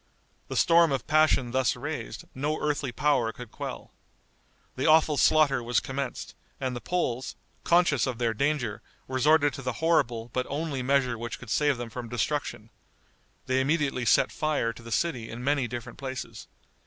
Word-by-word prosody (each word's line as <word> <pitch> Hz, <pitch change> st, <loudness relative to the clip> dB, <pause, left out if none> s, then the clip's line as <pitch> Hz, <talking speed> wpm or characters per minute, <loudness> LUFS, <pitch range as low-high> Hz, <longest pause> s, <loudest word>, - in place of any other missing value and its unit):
The -, -, -5 dB
storm 170 Hz, -2 st, +5 dB
of 135 Hz, -3 st, -1 dB
passion 155 Hz, -5 st, +3 dB
thus 130 Hz, 0 st, +1 dB
raised, 145 Hz, +6 st, -6 dB
no 150 Hz, +3 st, -2 dB
earthly 145 Hz, -3 st, -1 dB
power 120 Hz, -3 st, +1 dB
could 120 Hz, -1 st, -11 dB
quell. -, -, -7 dB, 0.8 s
The 130 Hz, -, -1 dB
awful 155 Hz, -1 st, +5 dB
slaughter 140 Hz, -1 st, +4 dB
was 120 Hz, +1 st, +1 dB
commenced, 135 Hz, -1 st, -5 dB, 0.3 s
and 130 Hz, -2 st, -2 dB
the 120 Hz, -, -5 dB
Poles, 130 Hz, -8 st, -2 dB, 0.3 s
conscious 170 Hz, -7 st, +3 dB
of 125 Hz, -3 st, -3 dB
their 115 Hz, -1 st, 0 dB
danger, 135 Hz, -3 st, -1 dB, 0.3 s
resorted 145 Hz, +2 st, +3 dB
to 135 Hz, -, -7 dB
the 125 Hz, -1 st, -2 dB
horrible 120 Hz, -7 st, +1 dB
but 130 Hz, 0 st, -1 dB
only 145 Hz, -2 st, -2 dB
measure 130 Hz, -3 st, +1 dB
which 120 Hz, -1 st, -5 dB
could 120 Hz, -4 st, -10 dB
save 145 Hz, -3 st, +2 dB
them 120 Hz, -1 st, -6 dB
from 120 Hz, 0 st, -6 dB
destruction. 120 Hz, -3 st, -2 dB, 0.7 s
They 130 Hz, +1 st, +1 dB
immediately 140 Hz, -3 st, 0 dB
set -, -, +4 dB
fire 150 Hz, -7 st, -1 dB
to 120 Hz, -, -13 dB
the 115 Hz, 0 st, -10 dB
city 125 Hz, -6 st, -1 dB
in 120 Hz, +2 st, -7 dB
many 140 Hz, -2 st, +1 dB
different 120 Hz, -1 st, -7 dB
places. 130 Hz, -2 st, -6 dB
130 Hz, 165 wpm, -27 LUFS, 120-150 Hz, 0.8 s, storm